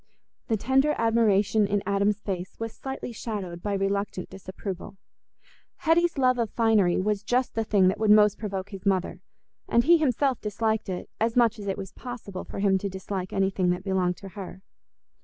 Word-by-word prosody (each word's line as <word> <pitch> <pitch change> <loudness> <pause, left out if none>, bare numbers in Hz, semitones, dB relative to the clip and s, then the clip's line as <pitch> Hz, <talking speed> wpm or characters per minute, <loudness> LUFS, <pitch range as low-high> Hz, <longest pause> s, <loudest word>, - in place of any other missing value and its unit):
The 220 - +1
tender 265 +7 +2
admiration 220 -2 +3
in 200 0 0
Adam's 200 +1 +1
face 185 -2 -5
was 225 -1 -4
slightly 265 -2 -6
shadowed 200 -7 -5
by 205 +1 -2
reluctant 195 -1 -2
disapproval. 190 0 -7 0.8
Hetty's 335 +1 +2
love 255 -2 +3
of 230 -2 0
finery 215 -7 +3
was 205 +1 0
just 245 +4 0
the 225 - 0
thing 200 -3 +3
that 190 - -2
would 220 -1 +1
most 210 -1 +6
provoke 195 -2 -4
his 195 -2 -8
mother, 185 -2 0 0.5
and 235 - +4
he 335 +4 +6
himself 270 -2 +1
disliked 220 0 -1
it 180 -1 -4
as 225 +1 +1
much 235 -2 +3
as 200 - -7
it 195 - -1
was 195 -2 -6
possible 235 -7 -7
for - - -9
him 195 -1 +2
to 200 - -3
dislike 190 0 -5
anything 195 -2 +1
that 180 +1 -1
belonged 185 -2 0
to 195 - -10
her. 190 -1 -9
205 Hz, 180 wpm, -26 LUFS, 190-225 Hz, 0.8 s, most